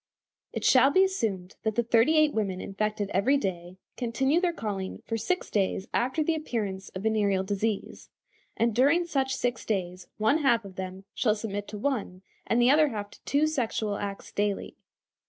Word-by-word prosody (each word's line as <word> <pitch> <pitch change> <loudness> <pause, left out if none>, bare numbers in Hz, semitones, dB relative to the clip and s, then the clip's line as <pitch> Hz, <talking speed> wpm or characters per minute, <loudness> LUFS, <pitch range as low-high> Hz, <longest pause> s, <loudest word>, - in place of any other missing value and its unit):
It - - -4
shall 265 +1 +6
be 375 +7 +5
assumed 210 - -2
that 220 -2 -1
the 235 - +2
thirty 235 +7 +4
eight 305 -1 +4
women 195 -4 -1
infected 205 +1 -2
every 235 +10 +3
day 180 -6 -4 0.2
continue 265 +7 +1
their 360 -2 +2
calling 200 - -5
for 225 - -2
six 295 +12 -2
days 195 -1 0
after 260 +6 +1
the 330 - +1
appearance 210 -11 -3
of 185 - -5
venereal 205 -3 +2
disease, 205 +2 -3 0.5
and 230 0 +2
during 290 +9 +4
such 265 -5 0
six 245 -3 -2
days 180 -3 -3
one 220 +9 +3
half 235 -7 +2
of 190 -2 -10
them 190 0 -6
shall 215 -4 +2
submit 205 -2 -4
to 210 - -7
one, 205 -7 -2 0.2
and 230 - +2
the 245 +2 +5
other 305 +1 +5
half 205 -6 -5
to - - -17
two 285 +2 +2
sexual 230 -8 -1
acts 200 -1 -5
daily. 205 -1 -2
220 Hz, 180 wpm, -28 LUFS, 195-270 Hz, 0.5 s, shall